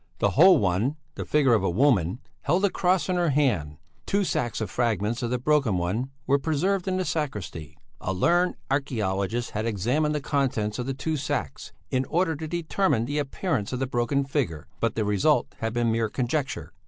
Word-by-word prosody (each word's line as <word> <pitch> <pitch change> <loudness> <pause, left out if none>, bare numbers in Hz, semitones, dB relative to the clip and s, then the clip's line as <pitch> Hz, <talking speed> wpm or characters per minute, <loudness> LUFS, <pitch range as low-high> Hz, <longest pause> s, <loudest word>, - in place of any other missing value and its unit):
The - - +2
whole 185 +5 +7
one, 100 +9 +1 0.2
the - - -5
figure 140 -5 +3
of 110 - +3
a 95 - +2
woman, 100 - +2 0.2
held 175 +7 +2
a 200 - +1
cross 180 0 +1
in 185 -1 0
her 175 -2 +2
hand; 110 - +1 0.3
two 200 +1 +2
sacks 120 - -1
of 110 - -3
fragments 115 0 0
of 120 - -1
the 125 - 0
broken 135 -6 +2
one 100 +9 -1 0.2
were 140 +2 +3
preserved 175 +6 0
in 185 0 0
the 185 - -1
sacristy. 105 - -4 0.2
A - - -3
learned 175 - +2 0.2
archæologist 115 -5 -1
had 110 +2 -2
examined 125 +9 0
the - - 0
contents 130 -7 -1
of 125 - -3
the 135 - -2
two 155 +3 -2
sacks, 145 +1 -3 0.2
in 130 +1 +1
order 170 +1 +1
to 160 +2 -6
determine 165 - 0
the 145 +4 -2
appearance 140 - -2
of - - -1
the 135 - 0
broken 125 +2 0
figure, 105 - -2
but 115 -2 0
the 110 - 0
result 100 -2 +2
had 115 0 -1
been 120 0 +1
mere 110 -1 0
conjecture. 125 - -2
130 Hz, 195 wpm, -26 LUFS, 110-150 Hz, 0.3 s, whole